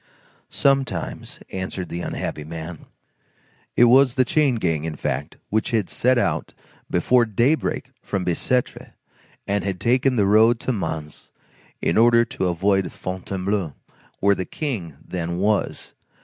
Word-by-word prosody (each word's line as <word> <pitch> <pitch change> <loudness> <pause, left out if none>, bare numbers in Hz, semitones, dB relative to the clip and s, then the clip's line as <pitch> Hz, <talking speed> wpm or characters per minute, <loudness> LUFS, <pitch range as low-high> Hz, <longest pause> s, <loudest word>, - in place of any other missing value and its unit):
"Sometimes," 135 -1 0
answered 95 -2 -4
the 85 - -4
unhappy 75 - -4
man. 80 +1 -8 0.9
It - - +5
was 125 +1 +6
the 130 -2 +3
chain 140 -1 +2
gang, 80 -8 -1
in 80 -1 -4
fact, - - -3
which 110 +3 +1
had 110 - 0
set 125 +12 +2
out - - -1 0.3
before 120 +8 +3
daybreak 120 +8 0
from 95 -2 -3
Bicêtre, 120 +8 -1 0.5
and 100 0 -1
had 95 -2 -3
taken 125 +5 +2
the 105 -4 +3
road 110 +4 +5
to 130 - -1
Mans 80 -7 -5 0.5
in 85 - +2
order 115 0 +5
to 95 - -2
avoid 95 +2 +1
Fontainebleau, 95 -2 -3 0.4
where 100 +1 +4
the 95 - -2
King 95 - -4
then 85 -1 -3
was. 105 +2 -1
100 Hz, 135 wpm, -23 LUFS, 85-120 Hz, 0.9 s, was